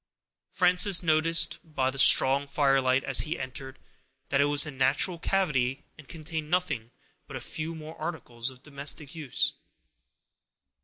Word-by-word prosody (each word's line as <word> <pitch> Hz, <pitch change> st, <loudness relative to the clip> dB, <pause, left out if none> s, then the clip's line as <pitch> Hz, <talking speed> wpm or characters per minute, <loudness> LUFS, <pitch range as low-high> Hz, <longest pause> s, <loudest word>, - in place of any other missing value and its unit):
Frances 180 Hz, 0 st, +3 dB
noticed, 165 Hz, +1 st, +3 dB
by 135 Hz, -6 st, -2 dB
the 135 Hz, -, -8 dB
strong 135 Hz, +2 st, +5 dB
firelight, 135 Hz, -2 st, +1 dB
as -, -, +3 dB
he 165 Hz, +1 st, -1 dB
entered, 130 Hz, +1 st, -8 dB, 0.5 s
that 140 Hz, 0 st, +1 dB
it -, -, +3 dB
was 145 Hz, +1 st, +4 dB
a 150 Hz, -, -6 dB
natural 140 Hz, +6 st, 0 dB
cavity, 145 Hz, -10 st, -1 dB
and 155 Hz, -3 st, -16 dB
contained 160 Hz, -1 st, -7 dB
nothing 150 Hz, -10 st, -2 dB, 0.4 s
but -, -, -10 dB
a -, -, -6 dB
few 160 Hz, +2 st, -6 dB
more 160 Hz, 0 st, -10 dB
articles 130 Hz, -7 st, -6 dB
of 130 Hz, 0 st, -16 dB
domestic 145 Hz, 0 st, -4 dB
use. 155 Hz, -6 st, -2 dB
150 Hz, 145 wpm, -27 LUFS, 135-165 Hz, 0.5 s, strong